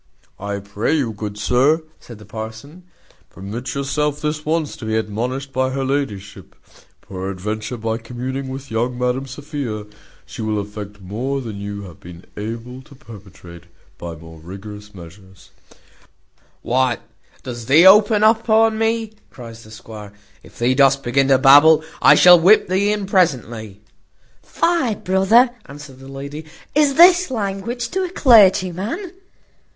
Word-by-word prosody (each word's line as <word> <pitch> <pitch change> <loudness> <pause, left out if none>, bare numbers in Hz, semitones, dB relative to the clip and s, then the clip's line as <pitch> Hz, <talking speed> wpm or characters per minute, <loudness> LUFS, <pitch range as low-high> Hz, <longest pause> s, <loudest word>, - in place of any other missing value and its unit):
"I 100 +1 -4
pray 100 +8 -2
you, 130 -6 -1
good 105 0 -7
sir," 135 +9 +2 0.2
said 120 - -13
the 105 - -15
parson, 110 - -9 0.4
"permit 110 +8 -7
yourself 140 +1 -2
this 150 0 -3
once 155 -1 -2
to 115 - -9
be 110 0 -1
admonished 125 +6 -4
by 130 0 0
her 135 +1 -3
ladyship: 105 - -4 0.5
peradventure, 100 +5 -5
by 115 0 -3
communing 130 +3 -6
with 135 0 -8
young 120 +2 -2
Madam 125 +2 -2
Sophia, 135 -6 -6 0.4
she - - -9
will 110 -1 -1
effect 105 0 -8
more 120 +9 -4
than 110 -6 -7
you 100 0 -6
have 90 -5 -13
been 85 0 -13
able 115 +4 -7
to 140 +1 -18
perpetrate 95 -7 -14 0.3
by 85 -1 -7
more 80 0 -14
rigorous 105 +4 -11
measures." 95 +2 -15 1.1
"What, 125 -1 0 0.4
dost 120 -2 -7
thee 155 +6 +6
open 210 +2 +6
upon 220 0 +3
me?" 225 -1 -1 0.2
cries 115 -3 -12
the 110 - -16
squire: 110 -2 -11 0.3
"if - - -18
thee 120 +2 +1
dost 135 0 +3
begin 135 +3 +1
to 135 -1 +5
babble, 145 +4 +6 0.2
I - - +7
shall 180 -1 +7
whip 190 +6 +5
thee 195 +3 +1
in 210 -1 -2
presently." 120 - -1 0.6
"Fie, 335 -10 0
brother," 195 +7 +3 0.2
answered 140 -2 -12
the 135 - -13
lady, 140 +3 -8 0.3
"is 290 -2 +2
this 355 +1 +6
language 230 +1 -4
to 380 +2 -2
a 365 - -3
clergyman? 220 - +3
130 Hz, 145 wpm, -19 LUFS, 105-170 Hz, 1.1 s, I